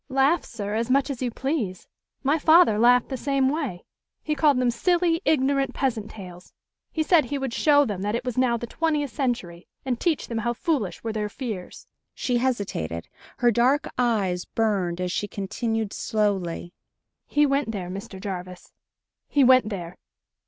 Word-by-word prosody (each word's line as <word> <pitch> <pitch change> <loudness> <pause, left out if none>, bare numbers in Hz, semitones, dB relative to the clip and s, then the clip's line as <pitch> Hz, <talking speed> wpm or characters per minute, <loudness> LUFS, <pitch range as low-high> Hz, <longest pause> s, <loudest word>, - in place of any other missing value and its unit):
"Laugh, 270 +5 +3
sir, 205 -3 -5
as 230 +2 -1
much 275 +2 +2
as 265 - -6
you 250 - 0
please. 235 - -3 0.4
My 290 +4 +2
father 315 -8 +5
laughed 245 +2 +5
the 265 - -3
same 275 0 +1
way. 275 - -3 0.4
He 305 - -1
called 295 -2 +3
them 250 -1 +2
silly, 340 +6 +1
ignorant 275 -2 +2
peasant 230 -6 -1
tales. 180 -3 -11 0.4
He 315 - 0
said 310 -2 +4
he 280 +3 -3
would 270 -3 -3
show 290 +1 +4
them 205 -6 -4
that 205 +2 -1
it 235 - -3
was 250 -3 -2
now 255 -2 +2
the 240 - -5
twentieth 300 0 -1
century, 230 - -3 0.2
and 250 -3 -1
teach 330 -5 0
them 230 -1 -3
how 235 +2 -1
foolish 235 - -2
were 225 -1 -3
their 210 -1 -2
fears." 215 -6 -6 0.3
She 245 -2 0
hesitated. 195 - -2 0.3
Her 240 -1 +4
dark 255 +6 +2
eyes 200 -8 +1
burned 195 -6 -1
as 180 -1 -2
she 205 - -2
continued 215 +2 -3
slowly: 195 -6 -1 0.5
"He 295 0 +3
went 275 -3 +1
there, 185 -4 -5
Mr. 195 0 -7
Jarvis. 185 -2 -7 0.5
He 285 - +3
went 255 -4 +5
there! 180 -4 -6
240 Hz, 175 wpm, -25 LUFS, 200-275 Hz, 0.5 s, father